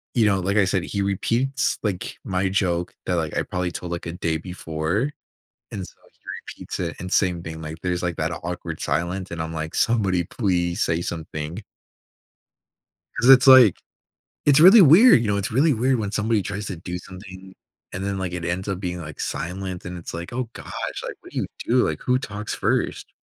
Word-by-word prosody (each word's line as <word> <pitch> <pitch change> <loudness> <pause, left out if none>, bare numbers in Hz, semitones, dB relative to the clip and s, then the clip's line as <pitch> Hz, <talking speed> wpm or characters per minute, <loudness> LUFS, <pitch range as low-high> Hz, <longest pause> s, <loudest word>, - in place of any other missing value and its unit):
you 115 -3 +4
know, 100 -2 +3
like 100 +3 0
I 100 - +5
said, 90 -1 0
he 100 +3 -3
repeats, 120 +7 0
like, 100 -5 -3
my 95 0 0
joke 90 -2 -1
that, 90 - 0
like, 80 -2 -2
I - - +1
probably 90 -1 -3
told, 85 0 -6
like, 85 - -4
a 85 - -4
day 85 -2 -1
before, 90 - -2 0.6
and 95 -3 -5
so - - -16 0.2
he - - -36 0.4
repeats - - -6
it 85 -2 -3
and 90 0 -6
same 90 -3 +2
thing. 80 -1 -7
Like, 80 0 -6
there's, 90 -1 -1
like, 85 -2 -2
that 80 +2 -1
awkward 85 -1 -5
silence, 85 +6 -2
and 85 - -5
I'm 80 0 -5
like, 80 0 -5
"Somebody 95 -6 +2
please 90 -2 -1
say 85 0 0
something." 80 +2 -5 1.5
'Cause 125 - +2
it's, 135 0 +8
like 130 -7 +8 0.7
it's 145 -1 +6
really 190 +7 +9
weird, 175 - +8
you 115 - -1
know, 100 - +1
it's 100 +1 -2
really 145 +5 +4
weird 125 +3 +1
when 105 -3 -2
somebody 110 0 +1
tries 100 +2 -5
to 95 - -5
do 90 +2 -5
something, 95 +1 -12 0.4
and 95 - -4
then, 100 -1 -2
like, 95 -2 -3
it 90 -1 -4
ends 90 +3 -2
up 95 -2 -2
being, 90 -2 -3
like, 75 -2 -8
silent. 90 +1 -4
And 90 0 -6
it's 85 - -8
like, 85 +4 -6
"Oh 125 -1 -3
gosh." - - -5
Like, - - -6
what - - -15
do - - -3
you - - -1
do? 125 +1 +2
Like, - - -3
who 125 0 +2
talks 105 -3 -5
first? - - -1
95 Hz, 205 wpm, -23 LUFS, 85-105 Hz, 1.5 s, really